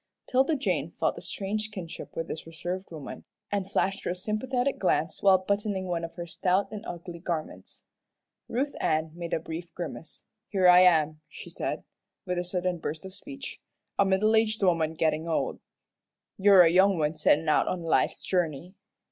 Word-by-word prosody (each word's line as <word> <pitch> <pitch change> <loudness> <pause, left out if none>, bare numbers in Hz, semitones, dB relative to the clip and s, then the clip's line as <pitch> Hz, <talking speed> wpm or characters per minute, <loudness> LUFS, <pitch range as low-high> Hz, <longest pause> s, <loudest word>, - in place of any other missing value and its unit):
'Tilda 265 +5 +3
Jane 270 - -1
felt - - +1
a - - -8
strange 210 +2 -3
kinship 185 -6 -8
with 165 0 -3
this 160 - -6
reserved 175 +4 -5
woman, 155 -4 -8 0.3
and 200 -2 -1
flashed 195 0 0
her - - -2
a 175 - -1
sympathetic 245 +7 -1
glance 160 -4 0
while 195 -1 +6
buttoning 200 0 -1
one 175 -2 -2
of 165 - -6
her 175 - -5
stout 185 +4 0
and 215 -1 -6
ugly 175 0 -7
garments. 155 - -5 0.7
Ruth 275 +5 -1
Ann 155 0 0
made 170 0 -6
a - - +1
brief 165 +2 -7
grimace. 170 -2 -7 0.2
"Here 190 -3 +3
I 180 0 +9
am," 155 -4 +4
she - - -10
said, - - -3 0.4
with 180 -1 -1
a - - -1
sudden 180 -1 -2
burst 155 +3 -5
of 190 - -8
speech, 275 +5 -8 0.4
"a - - +7
middle 200 +3 +3
aged 220 -1 +2
woman 165 -3 +2
gettin' 160 0 0
old. 165 - -1 0.8
You're 195 -3 +7
a 165 - +5
young 190 +1 +5
one 155 0 0
settin' 155 +1 +3
out 155 - +3
on 180 -2 -2
life's 165 - +1
journey. 175 -1 -1
180 Hz, 180 wpm, -28 LUFS, 165-200 Hz, 0.8 s, I